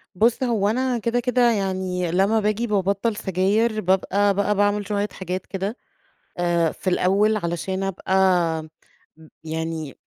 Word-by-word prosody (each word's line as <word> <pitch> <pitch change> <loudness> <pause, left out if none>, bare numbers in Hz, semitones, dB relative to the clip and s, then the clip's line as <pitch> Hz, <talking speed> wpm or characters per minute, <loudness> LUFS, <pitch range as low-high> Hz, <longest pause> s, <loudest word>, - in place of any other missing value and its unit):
بُص، 230 +6 +2
هو 225 -5 +1
أنا 255 +2 0
كده 235 +2 0
كده 245 -1 +3
يعني 185 -4 -1
لما 195 +5 +2
باجي 215 +2 0
بابطّل 200 +2 0
سجاير 210 +4 0
بابقى 195 +2 +2
بقى 205 +1 +1
باعمل 205 0 +1
شوية 205 -1 -1
حاجات 185 0 -5
كده 195 +5 -4 0.6
آآ، 170 -2 +1
في 185 - -3
الأول 200 +4 +2
علشان 185 +2 -3
ابقى 195 -1 -3 1.3
يعني 160 -2 -4
200 Hz, 130 wpm, -23 LUFS, 185-215 Hz, 1.3 s, كده